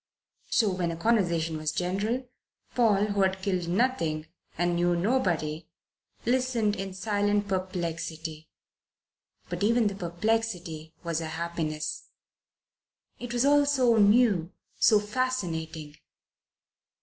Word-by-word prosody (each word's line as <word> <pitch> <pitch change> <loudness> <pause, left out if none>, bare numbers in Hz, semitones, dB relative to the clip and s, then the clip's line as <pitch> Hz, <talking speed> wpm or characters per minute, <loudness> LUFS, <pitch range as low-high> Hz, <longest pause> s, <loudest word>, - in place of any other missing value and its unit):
So 215 -5 +3
when 170 -3 -2
conversation 170 -6 +1
was 155 -1 -1
general, 210 +8 -1 0.5
Paul, 210 -4 +3
who 200 -1 0
had 190 0 +1
killed 185 -3 -1
nothing 170 -7 0 0.3
and 175 0 +1
knew 175 0 +2
nobody, 170 - 0 0.6
listened 240 -4 +1
in 195 -1 -5
silent 205 0 0
perplexity. 170 -4 -4 1.0
But - - -5
even 230 +2 +3
the 205 - +1
perplexity 175 -3 -2
was 170 -1 -1
a 160 - -3
happiness. 160 -2 -3 1.1
It 245 -1 -6
was 240 +2 +1
all 290 0 +5
so 255 -5 +3
new, 205 -5 +4 0.3
so 215 -3 +6
fascinating. 170 -10 -3
190 Hz, 110 wpm, -28 LUFS, 165-225 Hz, 1.1 s, so